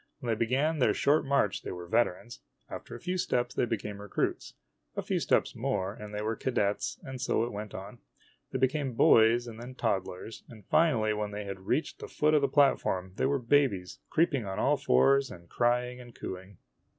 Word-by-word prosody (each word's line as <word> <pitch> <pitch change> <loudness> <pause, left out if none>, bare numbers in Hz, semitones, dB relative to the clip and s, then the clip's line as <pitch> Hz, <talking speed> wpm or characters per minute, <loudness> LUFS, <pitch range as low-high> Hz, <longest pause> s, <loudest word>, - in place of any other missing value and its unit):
When 125 -5 -5
they - - +2
began 135 +8 +1
their 125 - +3
short 145 +2 +3
march 135 -8 +1
they - - -6
were 90 -1 -7
veterans. 115 +3 0 0.3
After 120 - -7
a - - -8
few 180 +4 -3
steps 120 -6 0
they - - +1
became 105 -3 -4
recruits. 105 - -3 0.4
A - - -2
few - - 0
steps - - +1
more, 100 -1 -1
and 105 -1 -9
they 105 0 -4
were 110 +1 -1
cadets, 105 -4 -1
and 130 -2 -7
so 115 - +1
it 120 - -3
went 105 0 -6
on. 100 +6 -8 0.5
They - - -1
became 130 0 0
boys 115 +1 +5
and 115 -1 -9
then 125 +1 -9
toddlers; 100 -2 -3
and 110 -4 -13
finally, 115 - +3
when 105 0 -2
they 105 0 -6
reached 95 +11 -2
the - - -7
foot 150 +1 +1
of 150 - +4
the 140 - +3
platform, 115 -10 +2
they - - +2
were 140 +1 +1
babies, 120 -8 +1
creeping 155 -6 +2
on 95 -1 -5
all - - +3
fours 135 - +3
and 85 -5 -12
crying 125 +4 0
and 120 -2 -14
cooing. 95 +1 -8
115 Hz, 200 wpm, -29 LUFS, 105-130 Hz, 0.5 s, boys